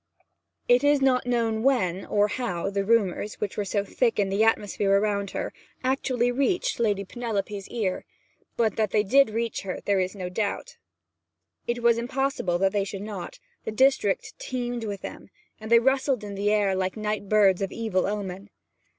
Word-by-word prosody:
It 245 +2 +5
is 290 0 +4
not 255 -2 +2
known 230 -3 0
when, 195 -9 +1
or 205 0 +3
how, 195 -5 -3
the 200 0 0
rumours, 210 -2 +1
which 205 - -4
were 205 - -1
so 200 +1 -1
thick 235 +2 0
in 200 -2 +1
the 200 +3 +2
atmosphere 205 -2 +1
around 200 0 +1
her, - - -4 0.3
actually 255 -2 +1
reached 280 +8 0
the 235 - 0
Lady 200 -2 0
Penelope's 205 -3 -4
ears, 205 -6 -2 0.5
but 225 -3 +1
that 215 -2 +1
they 210 +1 +2
did 275 +5 +4
reach 230 +1 -2
her 190 -2 -5
there 200 -1 +2
is 185 +2 -1
no 185 -2 -4
doubt. 205 - -3 0.9
It 240 0 -2
was 235 -1 +4
impossible 250 -7 -1
that 190 +1 +2
they 205 -1 +1
should 195 0 -6
not; 205 -4 -7 0.3
the - - -4
district 260 -3 +2
teemed 245 -2 -3
with 200 -2 -5
them; - - -8 0.3
they 220 +2 +4
rustled 265 -1 +2
in 205 -1 -6
the 200 +1 0
air 205 -2 +2
like 185 +2 -2
night 210 -2 -3
birds 200 -3 +4
of 195 - -2
evil 215 -6 -1
omen. 200 -1 -4
210 Hz, 180 wpm, -26 LUFS, 195-240 Hz, 0.9 s, It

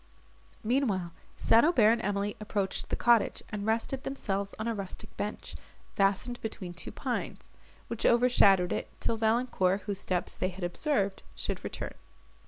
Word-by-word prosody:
Meanwhile 215 -8 0 0.2
St. 230 - +5
Aubert 245 -10 +5
and 230 0 +1
Emily 205 -1 -1
approached 205 -2 -2
the - - 0
cottage, 235 -2 +3
and 210 0 -4
rested 230 +4 0
themselves 200 -7 -3
on 220 - -3
a 230 - 0
rustic 195 -3 -7
bench, 210 - -5 0.4
fastened 200 +5 +1
between 195 -5 -5
two 175 - -6
pines, - - -4 0.4
which 230 - -4
overshadowed 220 -7 +5
it, - - -3
till - - 0
Valancourt, 220 -4 +2
whose 200 -2 -4
steps 180 -3 -2
they 185 - -1
had 185 0 -8
observed, 200 - 0
should - - -3
return. - - -5
210 Hz, 150 wpm, -30 LUFS, 195-235 Hz, 0.4 s, St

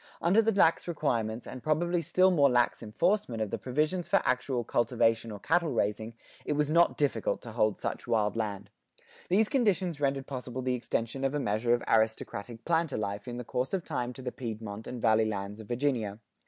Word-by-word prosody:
Under 185 +7 +4
the 225 0 +2
lax 180 -6 +3
requirements, 120 -9 -1
and 130 - -8
probably 170 +4 +1
still 185 +3 +3
more 145 -5 +5
lax 120 -1 +2
enforcement, 125 - 0
of 110 -2 -2
the - - -2
provisions 155 +7 -1
for - - +4
actual 125 -1 0
cultivation 115 -1 +1
or 105 - -6
cattle 170 - +1
raising,[92:1] 110 +1 -1 0.3
it - - 0
was 150 0 0
not 170 +2 +4
difficult 145 -2 0
to 115 - -8
hold 110 -2 +1
such - - -4
wild 105 -2 +1
land. 100 -3 -3 0.6
These 205 +4 +4
conditions 190 - +1
rendered 135 -1 0
possible 130 -2 -5
the 130 0 0
extension 120 +1 -2
of 135 +1 0
a - - +1
measure 115 0 +1
of 120 - -5
aristocratic 110 0 0
planter 165 -3 +1
life 100 0 -4
in 120 0 -5
the 125 - -4
course 125 - -1
of 180 - -4
time 125 -6 -2
to 130 - -10
the 125 - -3
Piedmont 110 -3 -6
and 125 - -5
Valley 110 -1 +3
lands 100 0 -4
of 110 - -10
Virginia. 120 -5 -1
125 Hz, 195 wpm, -29 LUFS, 110-155 Hz, 0.6 s, more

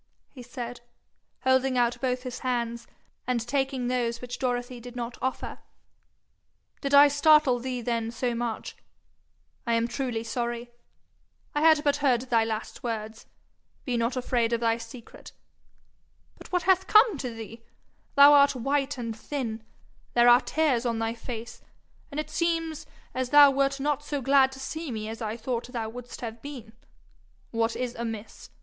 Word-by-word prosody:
he 260 - -11
said, 245 0 -7 0.6
holding 260 0 +2
out 240 0 +1
both 250 -1 -1
his 255 -1 -6
hands, 235 -2 -2 0.4
and 240 -3 0
taking 270 -1 -1
those 240 -2 -1
which 245 0 -7
Dorothy 245 -1 -2
did 245 +1 -11
not 240 0 -4
offer 260 0 -3 1.2
'did 275 - -2
I 285 +1 +9
startle 290 -3 +4
thee 250 0 -4
then 230 -1 -1
so 240 +1 -2
much? 235 -1 -4 0.9
I 235 - +2
am 230 0 +1
truly 240 -3 -3
sorry. 240 +1 -4 0.8
I 295 - 0
heard 315 -2 +5
but 285 -1 +2 0.3
thy 230 -1 +4
last 225 +1 -4
words; 220 -2 -5 0.6
be 250 - -1
not 235 +2 0
afraid 240 -2 0
of 235 - +1
thy 230 -1 +1
secret. 230 +1 -12 1.1
But - - -13
what 360 -1 +1
hath 380 -1 +3
come 430 - +5
to 255 - -3
thee? 225 0 -9 0.5
Thou 285 +1 +9
art 280 -1 +6
white 275 +3 -1
and 230 -2 -4
thin, 230 -3 -4 0.5
there 240 0 +6
are 240 +1 +7
tears 290 -8 +1
on 235 -2 -1
thy 225 0 -1
face, 235 0 -8 0.5
and 285 - -5
it 305 - -4
seems 330 -2 -1 0.3
as 255 -1 -2
thou 290 0 +8
wert 275 0 +1
not 290 0 0
so 295 -1 -3
glad 270 0 +4
to 265 - -10
see 315 +3 -5
me 215 -1 -4
as 225 +2 -7
I 220 0 -3
thought 235 +1 -3
thou 235 -3 -4
wouldst 245 +1 -9
have 230 -1 -6
been. 250 -6 -9 0.8
What 230 0 0
is 250 -1 -3
amiss? 225 -2 -7
245 Hz, 160 wpm, -27 LUFS, 230-275 Hz, 1.2 s, I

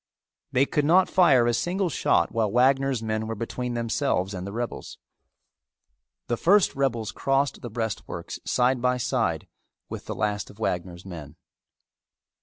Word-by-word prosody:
They 130 +2 +3
could 150 - 0
not 180 +5 +4
fire 140 -10 +5
a 120 - +2
single 180 +11 0
shot 85 - +1
while 110 -2 0
Wagner's 130 0 +2
men 110 0 -2
were 115 - -3
between 120 +2 -4
themselves 115 -5 0
and 90 0 -5
the - - -5
rebels. 120 +3 -5 1.3
The 120 - -1
first 195 - +4
rebels 120 -6 -1
crossed 135 +3 0
the 120 - -6
breastworks 110 -1 -5
side 125 0 +1
by 125 0 +2
side 125 - -1 0.4
with - - -7
the - - -4
last 105 -1 -2
of 105 - -15
Wagner's 90 -4 -3
men. 80 -7 -9
120 Hz, 150 wpm, -25 LUFS, 110-135 Hz, 1.3 s, fire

